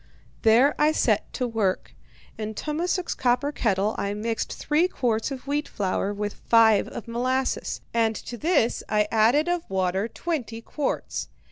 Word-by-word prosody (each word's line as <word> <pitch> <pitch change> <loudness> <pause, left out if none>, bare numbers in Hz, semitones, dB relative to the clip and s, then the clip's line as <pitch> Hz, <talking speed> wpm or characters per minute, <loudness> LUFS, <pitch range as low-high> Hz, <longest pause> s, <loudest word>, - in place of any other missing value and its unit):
"There 240 +6 +5
I 305 +1 +4
set - - +1
to 250 - -1
work. 215 -5 -1 0.4
In 215 0 -5
Tummasook's 340 - -1
copper 250 +3 +1
kettle 210 -5 0
I 200 +1 -2
mixed 225 +2 -2
three 305 +5 +1
quarts 235 -9 -1
of 270 -2 -7
wheat 290 +2 -1
flour 195 0 -1
with 205 0 -3
five 225 -3 +5
of 235 - -8
molasses, 255 +3 -1
and 225 -1 +2
to 240 - -7
this 295 -4 +1
I 210 -1 +2
added 235 +8 +4
of 350 -1 -1
water 190 +2 0
twenty 250 -6 -4
quarts. 285 +5 -3
230 Hz, 150 wpm, -25 LUFS, 215-285 Hz, 0.4 s, There